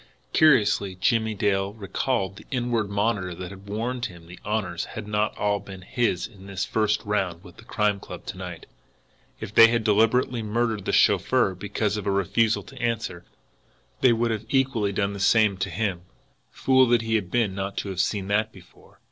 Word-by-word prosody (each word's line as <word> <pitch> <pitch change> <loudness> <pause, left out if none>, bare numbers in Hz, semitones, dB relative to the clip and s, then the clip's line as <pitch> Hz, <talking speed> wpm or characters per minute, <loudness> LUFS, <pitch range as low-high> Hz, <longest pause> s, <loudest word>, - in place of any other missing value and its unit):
Curiously 105 -10 +4
now - - -27
Jimmie 110 +2 +1
Dale 100 0 0
recalled 100 0 -2
the - - -14
inward 120 -4 -1
monitor 100 -3 -1
that 90 +1 -7
had 100 +1 -12
warned 120 +4 -2
him 85 -2 -14
the 90 +2 -12
honours 105 -5 -2
had 110 -1 -8
not 105 0 -1
all 105 0 +1
been 95 -2 -11
his 95 -5 0
in 100 -4 -13
this 100 -1 -3
first 105 -1 0
round 95 -4 -1
with 90 -2 -15
the - - -13
Crime 105 -3 0
Club - - -10
to - - -6
night. - - -8 0.7
If 110 -1 -7
they 115 - +9
had 115 0 0
deliberately 115 +3 +2
murdered 110 -1 -1
the - - 0
chauffeur 95 - +3
because 100 +2 -2
of 105 - -5
a - - +2
refusal 105 +4 +1
to 135 -2 -12
answer, 110 -7 -2 0.7
they 130 - +5
would 115 -2 -1
equally 130 -6 +1
have 100 - -6
done 100 -1 0
the 100 - -7
same 105 0 +4
to 95 - -2
him. 100 -6 -2 0.5
Fool 130 -1 +3
that 120 -1 +3
he 115 0 -2
had 105 -5 0
been 115 -2 +1
not 100 0 -4
to 100 - -3
have 95 -2 -5
seen 100 -2 -1
that 110 +2 +1
before! 95 -4 -19
105 Hz, 195 wpm, -25 LUFS, 95-115 Hz, 0.7 s, they